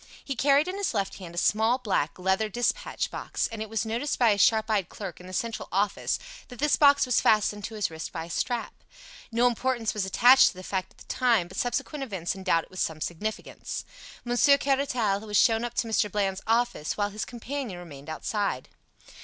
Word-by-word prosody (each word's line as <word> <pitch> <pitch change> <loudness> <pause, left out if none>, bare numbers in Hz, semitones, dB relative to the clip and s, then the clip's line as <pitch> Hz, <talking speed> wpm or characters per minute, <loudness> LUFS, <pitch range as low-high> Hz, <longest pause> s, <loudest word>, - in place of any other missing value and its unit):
He 275 - -3
carried 280 +4 +3
in 370 +2 -3
his 400 - -1
left 195 0 -2
hand 170 -2 -9
a - - -10
small 220 +6 +3
black, 200 - -1
leather 190 +4 +1
dispatch 245 - -1
box, - - -2
and 225 -2 -5
it 220 - -5
was 225 -2 -1
noticed 235 +6 -2
by 235 -3 +4
a 205 - +1
sharp 220 +2 +4
eyed 205 -6 0
clerk 195 -5 -7
in 180 - -12
the - - -9
Central 225 +4 -3
office 200 +2 0 0.3
that 245 - -11
this 295 +3 +3
box 285 -2 +5
was 250 -2 +2
fastened 210 -1 +2
to 225 - -7
his 210 -5 -1
wrist 160 0 -6
by 165 -1 -5
a - - -12
strap. 240 +4 -2 0.6
No 235 +2 +2
importance 245 -1 0
was 210 - -1
attached 245 +7 +6
to - - -1
the 185 - -9
fact 190 0 -3
at - - -26
the - - -15
time, 235 -8 +2
but 185 - -11
subsequent 275 +4 -2
events 190 -9 -3
endowed 185 -4 +1
it - - -19
with 185 - -8
some 160 -1 -1
significance. 210 +7 -5 0.4
Monsieur 245 +4 +4
Caratal 265 -8 +1
was 210 -1 +1
shown 225 0 +4
up 240 0 -4
to 230 - 0
Mr. 215 -2 +1
Bland's 195 -1 -1
office, 230 -8 0
while 205 -1 0
his 210 +1 -4
companion 245 -3 -5
remained 155 -4 -10
outside. 195 -3 -2
220 Hz, 210 wpm, -27 LUFS, 190-245 Hz, 0.6 s, attached